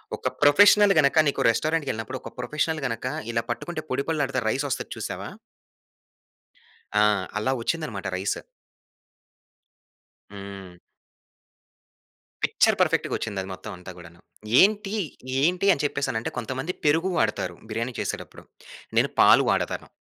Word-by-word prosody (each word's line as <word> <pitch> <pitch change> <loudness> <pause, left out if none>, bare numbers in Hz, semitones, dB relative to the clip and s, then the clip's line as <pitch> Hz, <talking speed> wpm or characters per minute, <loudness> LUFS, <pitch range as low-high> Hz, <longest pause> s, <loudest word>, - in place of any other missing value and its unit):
ఒక - - -2
ప్రొఫెషనల్ 205 +7 +7
గనక 140 +2 +3
నీకు 140 - 0
రెస్టారెంట్‌కెళ్ళినప్పుడు, 130 -3 -1
ఒక - - -8
ప్రొఫెషనల్ 150 +5 -1
గనక 115 -1 -3 0.3
ఇలా 115 0 0
పట్టుకుంటే 155 +7 -4
పొడిపొడిలాడతా 140 -1 -1
రైసొస్తది 135 +2 -2
చూసావా? - - -5 1.7
ఆ! - - +6 0.4
అలా 110 +5 0
వచ్చిందనమాట 115 -8 -3
రైస్. 95 +2 -1 2.0
హ్మ్. 100 -2 -9 1.7
పిక్చర్ - - +3
పర్ఫెక్ట్‌గొచ్చింది 100 -3 0
అది 95 - -9
మొత్తం 95 - -8
అంతా 90 +1 -10
గూడాను. 85 -1 -14 0.4
ఏంటి? 205 0 +3 0.5
ఏంటి 180 +5 +2
అని 145 - -1
చెప్పేసనంటే 140 -6 -1
కొంతమంది 130 +8 -3
పెరుగు 165 +5 +3
వాడుతారు 110 -1 0 0.2
బిర్యానీ 115 +3 -3
చేసేటప్పుడు. - - -5 0.6
నేను - - +3
పాలు - - +7
వాడతాను. - - -1
130 Hz, 110 wpm, -25 LUFS, 110-160 Hz, 2.0 s, ప్రొఫెషనల్